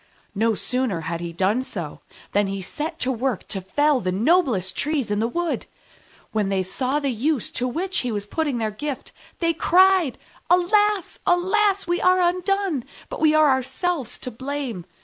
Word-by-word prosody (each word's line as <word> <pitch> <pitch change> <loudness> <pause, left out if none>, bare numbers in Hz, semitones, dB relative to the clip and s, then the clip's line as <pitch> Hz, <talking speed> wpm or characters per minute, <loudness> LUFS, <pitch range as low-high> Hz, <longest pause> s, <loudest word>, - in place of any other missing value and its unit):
No 220 +2 +1
sooner 250 -7 -1
had 165 +1 -4
he 170 -1 -4
done 195 +8 +1
so 175 - -6 0.3
than 205 0 +2
he 195 0 -3
set 305 - -4
to 260 - +1
work 255 -3 -2
to 195 - -3
fell 290 +9 +2
the 185 -4 -1
noblest 220 - +2
Trees 285 -7 0
in 205 - +1
the 225 - +1
wood. 345 +7 -2 0.6
When 210 -3 0
they 190 -1 +1
saw 255 +9 -1
the 280 -2 -1
use 255 +2 -1
to 250 - -1
which 360 +8 -1
he 250 - -2
was 205 -2 -3
putting 290 +3 -1
their 220 -2 -1
gift, 280 +5 -5 0.3
they 335 -1 +1
cried, 365 -3 +4 0.3
"Alas! 400 +2 +2
alas! 390 +3 +3
We 350 0 0
are 365 0 +4
undone, 365 - +1 0.3
but - - -6
we 310 -1 +5
are 310 -2 +6
ourselves 265 +2 -1
to 250 - -5
blame. 260 -6 -4
265 Hz, 175 wpm, -23 LUFS, 215-345 Hz, 0.6 s, are